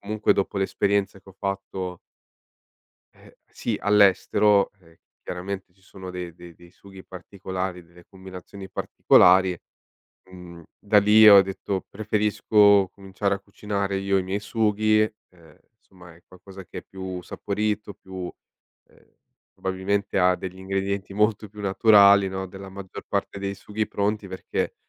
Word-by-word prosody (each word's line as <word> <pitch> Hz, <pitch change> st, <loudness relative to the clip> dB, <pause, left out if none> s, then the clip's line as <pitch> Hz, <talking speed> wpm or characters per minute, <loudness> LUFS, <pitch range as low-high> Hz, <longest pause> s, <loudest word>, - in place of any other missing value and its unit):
comunque 105 Hz, +1 st, +1 dB
dopo 100 Hz, 0 st, -2 dB
l'esperienza 100 Hz, 0 st, 0 dB
che 95 Hz, -, -21 dB
ho -, -, -17 dB
fatto 95 Hz, -2 st, -4 dB, 1.2 s
ehm, -, -, -19 dB
sì, 110 Hz, -3 st, -4 dB
all'estero, 100 Hz, 0 st, +3 dB
eh, 85 Hz, -2 st, -23 dB, 0.2 s
chiaramente 95 Hz, +1 st, -6 dB
ci 95 Hz, -, -31 dB
sono 95 Hz, -1 st, -11 dB
dei 90 Hz, -2 st, -7 dB
dei 85 Hz, 0 st, -13 dB
dei 85 Hz, +1 st, -18 dB
sughi 95 Hz, -1 st, -15 dB
particolari, 95 Hz, -1 st, -6 dB
delle 85 Hz, +1 st, -19 dB
combinazioni 95 Hz, 0 st, -11 dB
particolari, 95 Hz, -1 st, +4 dB, 0.7 s
mhmm, 90 Hz, -2 st, -12 dB, 0.2 s
da 105 Hz, +1 st, +3 dB
lì 105 Hz, +1 st, +7 dB
ho 100 Hz, -1 st, +9 dB
detto: 95 Hz, 0 st, -4 dB
"Preferisco 105 Hz, -1 st, +3 dB
cominciare 100 Hz, 0 st, -3 dB
a -, -, -5 dB
cucinare 100 Hz, -1 st, -4 dB
io 95 Hz, 0 st, +1 dB
i -, -, -1 dB
miei 95 Hz, +2 st, -3 dB
sughi." 110 Hz, 0 st, +1 dB, 0.3 s
Ehm, 85 Hz, -4 st, -21 dB, 0.2 s
insomma 90 Hz, -5 st, -17 dB
è 85 Hz, -, -22 dB
qualcosa 95 Hz, +1 st, -13 dB
che -, -, -9 dB
è -, -, -8 dB
più 95 Hz, -1 st, -7 dB
saporito, 105 Hz, +2 st, -3 dB
più 95 Hz, -1 st, -8 dB, 0.6 s
ehm, -, -, -26 dB, 0.4 s
probabilmente 95 Hz, +2 st, -2 dB
ha 90 Hz, 0 st, +4 dB
degli 95 Hz, 0 st, -8 dB
ingredienti 95 Hz, +1 st, -3 dB
molto 105 Hz, +1 st, +1 dB
più 105 Hz, +1 st, -12 dB
naturali, 100 Hz, -1 st, +5 dB
no, 95 Hz, 0 st, -5 dB
della 95 Hz, +1 st, -10 dB
maggior 95 Hz, -1 st, -9 dB
parte 100 Hz, -, -2 dB
dei 100 Hz, 0 st, -4 dB
sughi 105 Hz, +2 st, -4 dB
pronti 105 Hz, 0 st, -2 dB
perché 95 Hz, 0 st, -4 dB
95 Hz, 140 wpm, -24 LUFS, 95-100 Hz, 1.2 s, ho